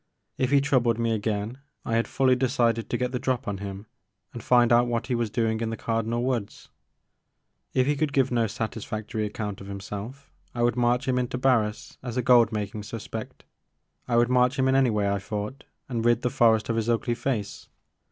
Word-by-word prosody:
If 130 - +1
he 140 0 +4
troubled 125 -5 +2
me 115 -1 0
again 110 +2 -2 0.3
I 115 - -2
had 115 - +1
fully 130 -1 +3
decided 120 -3 +1
to 120 - 0
get 125 0 -1
the 125 - -2
drop 130 -1 -1
on 100 -2 -3
him 100 0 -6 0.5
and - - -7
find 120 -1 +4
out 120 +1 +5
what 120 0 -1
he 125 - -2
was 120 -2 0
doing 110 0 0
in 115 - -1
the 115 - -4
Cardinal 115 +1 -1
Woods. 120 -5 -3 1.1
If 130 - +4
he 145 +2 +1
could 150 0 0
give 135 -2 +2
no 115 -2 +2
satisfactory 110 0 -4
account 105 -1 -5
of 100 - -9
himself 105 +7 -7 0.2
I 120 - 0
would 120 -1 +2
march 125 +2 +1
him 125 -1 +2
in 125 - 0
to 125 - -4
Barris 115 -5 0
as 125 -1 -5
a 125 - +1
gold 120 -2 +5
making 105 -1 -3
suspect, 105 0 -7 0.3
— - - -47
I 120 - 0
would 120 +1 +4
march 125 +2 +3
him 130 0 +2
in 130 - +3
anyway, 115 -7 +2
I 100 0 0
thought, 105 +6 -5 0.2
and 120 -3 -2
rid 120 0 +3
the 125 - 0
forest 115 -5 +3
of 115 - 0
his 115 +1 -1
ugly 120 +1 +1
face. 115 -4 -3
120 Hz, 210 wpm, -26 LUFS, 110-125 Hz, 1.1 s, out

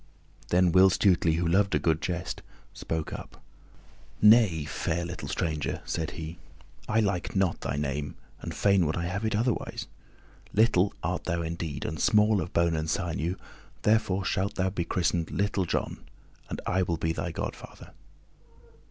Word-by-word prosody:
Then 90 0 +3
Will 95 +2 +7
Stutely, 90 -4 +3
who 85 +1 0
loved 100 +3 +3
a - - +5
good 80 -1 +1
jest, 85 -1 -3 0.3
spoke 80 -1 -4
up. - - -8 0.8
"Nay, 105 -8 +6
fair 80 +3 -2
little 90 0 -6
stranger," 75 -5 -2
said 80 -1 -2
he, 80 +1 -6 0.5
"I 115 +2 +3
like 100 -4 -1
not 95 -3 +1
thy 65 - -2
name 75 0 -3 0.3
and - - -5
fain 100 -4 +3
would 80 - -1
I 85 - -1
have 100 +5 -2
it 110 - 0
otherwise. 115 +2 -1 0.7
Little 100 -3 +4
art - - -2
thou 85 0 -1
indeed, 80 -3 -4
and 80 +1 -4
small 105 -2 +4
of 90 - -5
bone 85 -1 +2
and 80 0 -2
sinew, 85 0 -1 0.5
therefore 105 -3 +2
shalt 100 +1 -1
thou 95 0 0
be 85 -3 -2
christened 85 -1 0
Little 100 -1 0
John, - - -2 0.5
and - - -4
I 95 - +1
will 85 -2 0
be 80 0 0
thy - - -3
godfather." - - -7
90 Hz, 160 wpm, -28 LUFS, 80-100 Hz, 0.8 s, Will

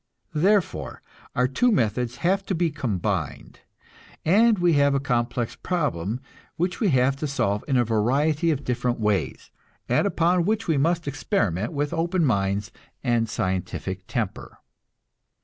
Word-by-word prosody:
Therefore, 165 - +1 0.3
our 125 +1 +3
two 240 - +2
methods 120 - 0
have 195 +2 +2
to 190 - 0
be 165 -1 +1
combined, 100 - -3 0.7
and 215 +6 +5
we 175 -2 +3
have 140 -1 +3
a - - +2
complex 120 -2 -1
problem 125 - -2 0.4
which 180 +2 -1
we 215 - +2
have 130 -1 +3
to 150 - -2
solve 105 -7 0
in 135 -3 +2
a 120 - +3
variety 140 +9 +1
of 145 -3 0
different 125 -1 -1
ways, 105 -2 -1 0.4
and - - +2
upon 175 +1 +2
which 215 +4 0
we 160 -3 +2
must 170 +2 +1
experiment 115 - -1
with 145 0 -2
open 170 +1 +1
minds 100 -4 0 0.3
and 115 -2 +1
scientific 95 -1 -3
temper. 115 -7 -4
135 Hz, 145 wpm, -24 LUFS, 110-165 Hz, 0.7 s, and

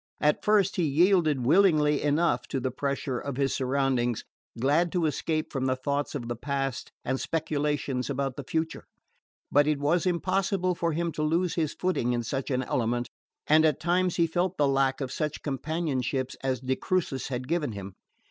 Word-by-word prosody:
At 150 0 +2
first 205 -2 +3
he 180 - +2
yielded 155 -3 +3
willingly 150 -2 +4
enough 150 +4 +1
to 135 - -2
the 130 0 -2
pressure 135 -1 -2
of 140 -2 -5
his 135 -1 +1
surroundings, 130 -3 0 0.4
glad 150 +7 +2
to 175 -3 +1
escape 155 +1 -1
from 135 -2 0
thoughts 140 +3 -2
of 120 -5 -4
the 120 - -2
past 135 +1 -3
and 130 +1 -1
speculations 145 -4 -1
about 135 -1 -2
the 140 - -6
future; 160 +4 -3 0.7
but 145 +1 +4
it 150 -1 +2
was 155 +5 +1
impossible 185 +1 +1
for 170 -1 -1
him 170 +1 -1
to 155 - -4
lose 165 +3 +1
his 160 -4 -1
footing 150 -10 0
in 120 -1 -1
such 135 +4 -3
an 130 -1 0
element, 120 0 -1 0.3
and 155 +1 +5
at 155 -3 +2
times 175 +1 +1
he 170 - +3
felt 175 +2 -1
the 145 - +3
lack 135 0 +1
of 130 -2 -3
such 150 -2 -3
companionship 135 -3 -2
as 130 -2 -1
de 130 0 0
Crucis 165 -7 -1
had 125 -1 -4
given 155 -6 -1
him. 100 -1 -7
145 Hz, 180 wpm, -27 LUFS, 130-165 Hz, 0.7 s, and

